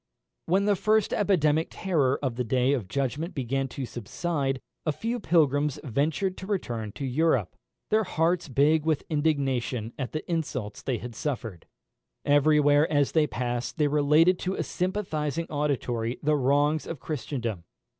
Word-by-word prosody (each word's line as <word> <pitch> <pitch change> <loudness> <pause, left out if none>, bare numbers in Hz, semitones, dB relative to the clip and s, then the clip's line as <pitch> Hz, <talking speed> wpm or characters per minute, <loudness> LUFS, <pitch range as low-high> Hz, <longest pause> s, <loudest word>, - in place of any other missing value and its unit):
When 190 +4 +2
the 205 -1 +3
first 215 +2 +2
epidemic 160 -6 +2
terror 145 -9 +1
of 130 -3 0
the 125 - -1
day 125 +3 +2
of 120 -9 -2
judgment 140 - -2
began 135 0 -1
to 130 +1 -5
subside, 135 - -2 0.2
a 155 - +1
few 230 +10 -3
pilgrims 150 - +2
ventured 155 - -1
to 190 - -8
return 120 - -3
to 140 - -5
Europe, 130 - +1 0.4
their 220 +1 +4
hearts 170 0 0
big 145 +3 +3
with 155 -2 0
indignation 135 -7 0
at 130 - -3
the 155 - -5
insults 140 - -3
they 130 -3 -1
had 120 +1 -7
suffered. 115 - -4 0.6
Every 145 +1 +4
where 145 +2 +4
as 145 -2 +2
they 155 -2 +3
passed 120 +1 -3
they 150 -2 +3
related 150 +5 +4
to 185 +1 -2
a - - -1
sympathising 170 -5 -2
auditory 125 -5 -1
the 150 +1 +3
wrongs 145 +3 +2
of 165 - -5
Christendom. 120 - -4
145 Hz, 155 wpm, -27 LUFS, 130-160 Hz, 0.6 s, their